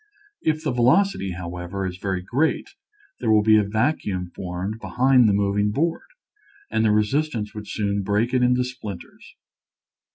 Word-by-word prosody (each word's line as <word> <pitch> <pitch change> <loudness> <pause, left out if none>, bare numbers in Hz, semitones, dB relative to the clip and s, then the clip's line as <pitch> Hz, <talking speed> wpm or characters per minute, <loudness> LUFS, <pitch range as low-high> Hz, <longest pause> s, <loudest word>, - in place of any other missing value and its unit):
If 155 0 0
the 150 - 0
velocity, 125 - +2
however, 90 +2 -5
is 90 -1 -4
very 95 -2 -2
great 135 - 0 0.5
there - - -1
will 110 -1 +5
be 110 0 +6
a - - +2
vacuum 100 - -1
formed 95 +4 -5
behind 125 -1 +3
the - - +4
moving 100 +1 +1
board, 165 +9 -1 0.6
and 110 - +1
the 110 - +3
re 105 0 +4
sistance 130 -4 -2
would 105 -1 -8
soon 100 -1 -1
break 105 +5 0
it 130 - +3
into 125 0 +3
splinters. 110 -8 -9
105 Hz, 160 wpm, -23 LUFS, 100-125 Hz, 0.6 s, be